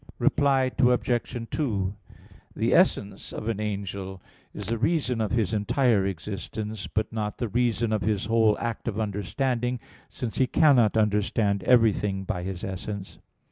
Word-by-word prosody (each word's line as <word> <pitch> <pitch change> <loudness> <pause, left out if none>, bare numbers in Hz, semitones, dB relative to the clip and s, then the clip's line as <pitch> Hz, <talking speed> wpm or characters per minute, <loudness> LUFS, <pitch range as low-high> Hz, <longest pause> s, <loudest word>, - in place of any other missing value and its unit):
Reply 135 -2 +2
Obj. 125 -2 +1
2: 100 -9 -1 0.6
The - - +1
essence 100 -1 +2
of 110 - -6
an 115 -3 -1
angel 100 -2 -4 0.3
is 105 - -7
the 115 +3 -2
reason 130 -4 +1
of 110 - 0
his 115 -3 0
entire 105 -1 +2
existence, 105 +3 -5
but 110 0 -2
not 105 -2 -3
the 120 - -2
reason 120 0 +1
of 105 - 0
his 105 -2 0
whole 110 -1 +3
act 115 0 -4
of 110 -2 -2
understanding, 120 +4 -1 0.3
since 120 -3 -5
he 130 - +4
cannot 125 -7 +4
understand 105 -1 +1
everything 105 -5 +3
by 90 -1 -3
his 95 +1 -5
essence. 95 0 -6
110 Hz, 145 wpm, -26 LUFS, 100-120 Hz, 0.6 s, he